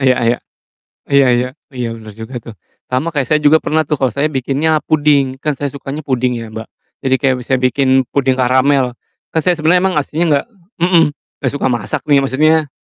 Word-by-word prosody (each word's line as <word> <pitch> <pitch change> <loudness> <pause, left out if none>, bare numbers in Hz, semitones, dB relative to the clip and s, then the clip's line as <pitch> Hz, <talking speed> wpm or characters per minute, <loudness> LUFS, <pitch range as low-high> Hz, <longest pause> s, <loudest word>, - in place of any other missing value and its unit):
Iya 130 -2 +3
iya. 120 - +1 0.7
Iya 140 -1 +5
iya. 125 +1 -1 0.2
Iya, 125 -2 -3
bener 110 -1 -11
juga 110 +4 -9
tuh. 115 - -10 0.4
Sama 130 +6 0
kayak 145 -5 -1
saya 150 0 +2
juga 150 +1 +5
pernah 160 +1 +1
tuh, 150 - +1
kalo 130 -1 0
saya 145 +4 0
bikinnya 140 +3 0
puding, 140 -3 +2
kan 150 -3 -1
saya 145 -1 -3
sukanya 140 +2 -6
puding 125 -3 0
ya, 115 -2 -7
Mbak. 110 +1 -7 0.3
Jadi 130 -1 +2
kayak 135 -2 +2
misalnya 130 +1 -1
bikin 135 +1 +1 0.2
puding 135 -2 +1
karamel. 130 0 +2 0.4
Kan 160 - +1
saya 180 +1 +2
sebenernya 165 +3 +3
emang 190 -3 0
aslinya 155 +4 0 0.2
gak - - -37 0.3
mhm, 175 -1 +4 0.4
gak 130 - 0
suka - - -1
masak 120 -3 -3
nih, 145 -2 +4
maksudnya 155 +3 +2
140 Hz, 195 wpm, -16 LUFS, 130-150 Hz, 0.7 s, Iya